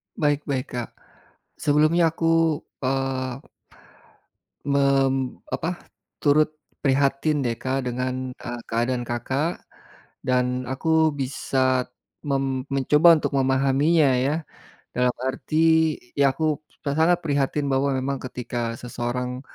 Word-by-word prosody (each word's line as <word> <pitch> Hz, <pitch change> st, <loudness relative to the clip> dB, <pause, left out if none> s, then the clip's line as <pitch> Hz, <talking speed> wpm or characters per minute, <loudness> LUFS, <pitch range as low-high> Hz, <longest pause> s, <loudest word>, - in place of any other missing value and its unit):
Baik 145 Hz, -1 st, 0 dB
baik, 130 Hz, -2 st, -1 dB
Kak. 120 Hz, -2 st, -4 dB, 0.7 s
Sebelumnya 155 Hz, +3 st, +3 dB
aku, 165 Hz, -1 st, +2 dB, 0.2 s
eee, 130 Hz, -1 st, -1 dB, 1.3 s
mem 140 Hz, -1 st, +3 dB, 0.4 s
apa, 165 Hz, -, -1 dB, 0.5 s
turut 150 Hz, +1 st, +5 dB, 0.3 s
prihatin 140 Hz, +1 st, +1 dB
deh 115 Hz, -2 st, -2 dB
Kak 130 Hz, 0 st, -1 dB
dengan, 130 Hz, +1 st, -3 dB
eee, 120 Hz, -1 st, -7 dB
keadaan 120 Hz, +2 st, -1 dB
Kakak 130 Hz, +8 st, -2 dB, 0.6 s
dan 125 Hz, 0 st, +1 dB
aku 160 Hz, +4 st, +2 dB
bisa 130 Hz, -1 st, 0 dB, 0.4 s
mem 135 Hz, -2 st, -1 dB
mencoba 150 Hz, +5 st, +5 dB
untuk -, -, -2 dB
memahaminya 135 Hz, +3 st, +3 dB
ya, 140 Hz, +4 st, +1 dB, 0.6 s
dalam 125 Hz, 0 st, +2 dB
arti 160 Hz, +3 st, +2 dB, 0.2 s
ya 140 Hz, -1 st, +5 dB
aku 155 Hz, -2 st, 0 dB
s -, -, -30 dB, 0.2 s
sangat 170 Hz, +2 st, +3 dB
prihatin 145 Hz, -1 st, 0 dB
bahwa 135 Hz, +1 st, +2 dB
memang 135 Hz, +1 st, -2 dB
ketika 120 Hz, -2 st, -4 dB
seseorang 125 Hz, +1 st, -3 dB
135 Hz, 105 wpm, -24 LUFS, 130-150 Hz, 1.3 s, turut